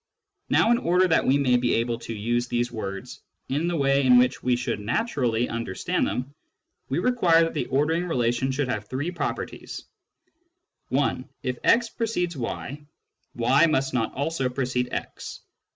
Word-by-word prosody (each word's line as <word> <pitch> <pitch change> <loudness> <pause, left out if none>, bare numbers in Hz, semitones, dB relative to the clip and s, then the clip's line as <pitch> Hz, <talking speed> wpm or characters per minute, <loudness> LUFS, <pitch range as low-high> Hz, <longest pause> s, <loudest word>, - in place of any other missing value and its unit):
Now, 230 - +4
in 240 - +4
order 180 -2 +3
that 160 - +2
we 135 - +4
may 130 -3 +3
be 120 -1 +1
able 115 0 -1
to 115 - -6
use 120 +3 0
these 120 0 -1
words 95 -4 -6 0.3
in 150 +5 0
the 175 - 0
way 140 -2 +2
in 125 -1 +6
which 125 +1 +3
we 125 0 +2
should 120 -3 -2
naturally 120 - 0
understand 115 -5 -2
them, 130 +3 -4 0.6
we - - -1
require 180 -10 +4
that 165 - -2
the 150 - -2
ordering 160 +6 +1
relation 125 -3 0
should 135 0 -1
have 105 -4 -3
three 145 +9 -3
properties: 175 - -5 0.6
— 350 0 -50
(1) 130 -1 0
If 125 -1 -3
x 235 0 +4
precedes 195 -7 -2
y, 140 +3 -5 0.5
y 130 +7 +4
must 135 -4 0
not 115 -3 0
also 140 -2 -1
precede 125 -1 -2
x. - - -6
130 Hz, 170 wpm, -25 LUFS, 120-165 Hz, 0.6 s, in